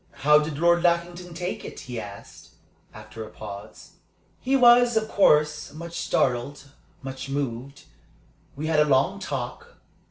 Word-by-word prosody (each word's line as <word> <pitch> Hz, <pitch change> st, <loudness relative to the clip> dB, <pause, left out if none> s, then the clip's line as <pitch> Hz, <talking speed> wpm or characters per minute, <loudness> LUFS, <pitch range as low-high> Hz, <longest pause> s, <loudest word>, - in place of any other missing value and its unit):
"How 150 Hz, 0 st, +7 dB
did 150 Hz, -1 st, -4 dB
Lord 170 Hz, +2 st, +3 dB
Lackington 175 Hz, 0 st, -1 dB
take 180 Hz, +2 st, -4 dB
it?" -, -, -9 dB
he 125 Hz, -2 st, -6 dB
asked, 100 Hz, -2 st, -11 dB, 0.4 s
after 110 Hz, +1 st, -10 dB
a 110 Hz, -, -10 dB
pause. 100 Hz, -2 st, -11 dB, 0.4 s
"He 265 Hz, +2 st, 0 dB
was, 240 Hz, -2 st, +6 dB
of 220 Hz, 0 st, 0 dB
course, 150 Hz, -7 st, +2 dB
much 170 Hz, +2 st, -8 dB
startled, 135 Hz, +3 st, -1 dB, 0.3 s
much 135 Hz, 0 st, -7 dB
moved. 135 Hz, 0 st, -4 dB, 0.7 s
We 150 Hz, +3 st, -5 dB
had 155 Hz, -1 st, +2 dB
a 150 Hz, -, +5 dB
long 145 Hz, +8 st, +2 dB
talk. 470 Hz, -, -6 dB
150 Hz, 140 wpm, -25 LUFS, 130-175 Hz, 0.7 s, How